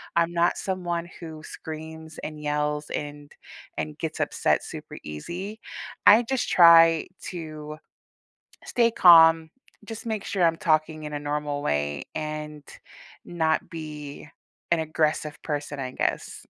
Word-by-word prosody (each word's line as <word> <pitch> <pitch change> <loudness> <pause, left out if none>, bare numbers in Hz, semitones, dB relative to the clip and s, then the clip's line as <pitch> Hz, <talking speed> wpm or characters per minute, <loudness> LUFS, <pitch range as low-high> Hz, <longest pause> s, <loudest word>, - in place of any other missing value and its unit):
I'm 170 0 +2
not 170 0 +2
someone 175 -3 -3
who 160 -2 -9
screams 160 0 -9
and 155 -1 -6
yells 150 0 -1
and 145 0 -5 0.5
and 75 -1 -4
gets - - -4
upset - - +1
super-easy, 175 - -7 0.5
I 220 +4 +8
just 260 +2 -1
try 165 -2 +7 0.2
to 155 -3 -7 0.9
stay 235 -1 +2
calm, 165 -4 +7 0.4
just 225 +1 -8
make 220 -3 -3
sure 190 -3 0
I'm 165 -1 +4
talking 155 -1 +1
in 150 - -6
a 145 - -2
normal 145 0 -3
way, 75 0 -1
and 150 -1 -5 0.6
not 160 -2 0
be 150 -3 -8 0.4
an 170 - +4
aggressive 155 -1 -1
person, 145 -1 -4
I 130 -1 -4
guess. - - -3
155 Hz, 125 wpm, -25 LUFS, 150-170 Hz, 0.9 s, I